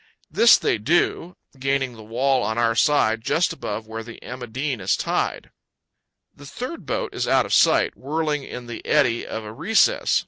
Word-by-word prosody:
This 235 - +6
they - - 0
do, 170 +6 0 0.2
gaining 135 -1 -1
the 110 - -13
wall 125 +4 0
on 110 -1 -2
our 115 -1 +2
side 115 -4 +2
just 170 +8 +1
above 110 -8 -5
where 110 0 -6
the 115 +1 -11
"Emma 125 +1 -7
Dean" 130 0 -3
is 90 - +1
tied. - - -2 0.8
The 145 - -13
third 250 - -7
boat - - -3
is - - -2
out - - +3
of - - -4
sight, - - +4
whirling 150 +1 -2
in 125 -2 -8
the 120 -1 -8
eddy 130 -6 +1
of 110 - -5
a 105 0 -8
recess. 225 - +2
130 Hz, 180 wpm, -23 LUFS, 115-150 Hz, 0.8 s, This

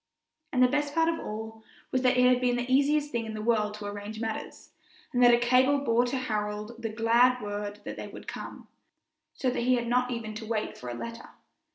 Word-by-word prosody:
And 255 -1 +3
the - - +7
best 290 +2 -1
part 325 0 +3
of 330 - -1
it - - -6
all 220 +1 -7 0.3
was 255 - +1
that 250 0 +3
it 250 - +5
had 250 0 +4
been 245 -1 +2
the 245 0 -1
easiest 290 +2 +3
thing 230 -2 -2
in 220 - -5
the - - -5
world 215 -2 +1
to 210 -1 -8
arrange 205 +1 -6
matters, 225 -1 -5 0.4
and 245 - +2
that 245 0 +8
a 240 - +6
cable 255 +4 +4
bore 245 -3 +2
to 265 +2 -1
Harold 210 -1 -3
the 225 - -2
glad 235 +3 +3
word 205 -1 -5
that - - -6
they - - -6
would - - -11
come, - - -8 0.7
so 255 -2 0
that - - -2
he 250 +1 +3
had 240 -1 -1
not 250 +1 +2
even 230 -3 -4
to 220 +1 -7
wait 220 -1 -2
for 125 - -8
a 120 - -4
letter. 230 - -7
235 Hz, 235 wpm, -28 LUFS, 215-255 Hz, 0.7 s, that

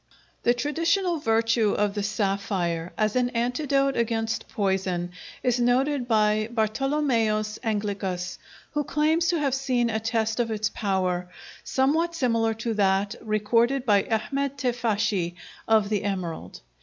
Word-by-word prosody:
] - - -36
The 240 - +4
traditional 330 +7 0
virtue 225 -3 +2
of 205 -1 +1
the 205 - -2
sapphire 195 -5 -1
as 215 +1 +1
an 250 -1 +2
antidote 275 +3 +1
against 225 -1 -1
poison 190 -3 -1 0.3
is 245 -1 +2
noted 250 +2 +2
by 215 -1 +2
Bartolomæus 225 -2 0
Anglicus, 200 -5 -2 0.3
who 295 0 0
claims 310 +4 +1
to 340 - +2
have 285 -4 0
seen 255 -3 +1
a 220 - 0
test 225 0 -1
of 235 -1 +1
its 215 -1 -1
power, 185 -3 -1 0.3
somewhat 320 +6 +1
similar 230 -6 +1
to 225 +1 -2
that 200 0 +2
recorded 230 +5 +1
by 205 -4 +4
Ahmed 275 +5 -1
Teifashi 215 -8 0 0.3
of 220 -2 +3
the 210 -2 0
emerald. 185 -5 -4
225 Hz, 135 wpm, -26 LUFS, 205-255 Hz, 0.3 s, The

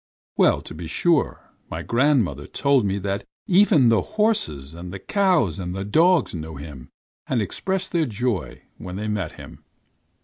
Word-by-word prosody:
Well, - - +3
to - - -9
be 80 +1 -7
sure, 165 - 0 0.2
my - - -5
grandmother 120 - +1
told 140 -6 +2
me 95 +1 -1
that 100 0 -3 0.2
even 185 - +5
the 110 -4 +4
horses 80 - -1
and 85 +1 -8
the 95 - -5
cows 170 - +1
and 90 -1 -4
the 95 0 -4
dogs 165 - +3
knew 80 -2 -6
him 70 -2 -10 0.4
and 130 - 0
expressed 190 - -2
their 165 -4 +1
joy 115 -4 -3 0.2
when 90 -1 -7
they 105 +2 -4
met 100 -7 -2
him. - - -12
105 Hz, 165 wpm, -23 LUFS, -, 0.4 s, even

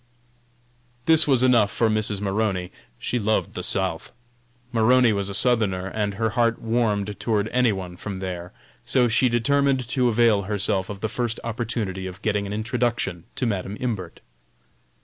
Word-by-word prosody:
This 160 -1 +5
was 130 -3 +4
enough 120 -5 +4
for 115 - +1
Mrs. 110 -2 0
Maroney, 95 -3 -1 0.3
she 125 - -2
loved 110 0 0
the - - -4
South. - - -1 0.6
Maroney 120 0 +4
was 100 -1 -1
a 100 - -2
Southerner, 105 -6 +2
and 100 0 -2
her 110 +1 0
heart 115 0 +1
warmed 105 -3 -1
toward 110 -2 0
any 125 -1 +3
one 95 -3 -5
from 95 +1 -6
there, 90 -2 -5 0.3
so 125 -2 +3
she 120 +2 +3
determined 135 +1 +1
to 125 -2 +2
avail 115 -3 +3
herself 100 -1 0
of 100 -1 -7
the 110 - 0
first 120 0 -3
opportunity 110 -5 -3
of 95 +2 -10
getting 105 -2 0
an - - -6
introduction 115 -5 -2
to 130 - -1
Madam 100 -2 -2
Imbert. 105 -9 -4
110 Hz, 160 wpm, -24 LUFS, 100-120 Hz, 0.6 s, This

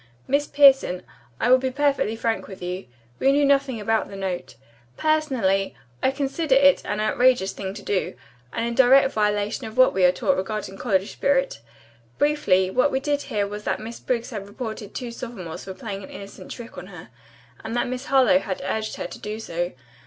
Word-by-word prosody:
Miss 285 +2 +1
Pierson, 270 -10 +5 0.4
I 245 - +2
will 255 - +7
be 260 0 -1
perfectly 275 -4 +1
frank 225 0 -2
with 190 -2 -10
you. 180 +2 -4 0.3
We 270 - +4
knew 285 +1 +3
nothing 275 -4 +2
about 220 +1 0
the 200 - -9
note. 190 -2 -4 0.4
Personally, 260 -12 +1 0.3
I - - +3
consider 275 +2 0
it 275 0 +5
an 205 - -2
outrageous 230 -1 +3
thing 190 0 -5
to 205 - -9
do, 190 -9 -1 0.4
and 230 - -2
in 235 - -2
direct 265 +2 +5
violation 210 +2 0
of 220 - -10
what 255 0 +6
we 190 - +1
are 180 - +7
taught 230 +9 0
regarding 195 0 -4
college 195 -4 0
spirit. 270 - 0 0.6
Briefly, 200 -12 +2
what 255 +7 +3
we 265 - 0
did 290 +1 -1
hear 205 -1 0
was 210 +1 -6
that - - -1
Miss 225 +2 -8
Briggs 245 0 -2
had 200 -4 -6
reported 215 -1 -7
two 245 -2 -4
sophomores 190 -9 -7
for 190 -1 -7
playing 200 -5 -6
an - - -10
innocent 200 0 -10
trick 235 -6 -8
on 180 - -10
her, 180 -11 -11 0.5
and 220 +1 -4
that 240 - +1
Miss 250 0 -4
Harlowe 275 +1 +5
had 190 -8 -4
urged 215 +3 -2
her - - -5
to - - -8
do 210 +1 -5
so. 175 -4 -3
225 Hz, 195 wpm, -24 LUFS, 195-270 Hz, 0.6 s, will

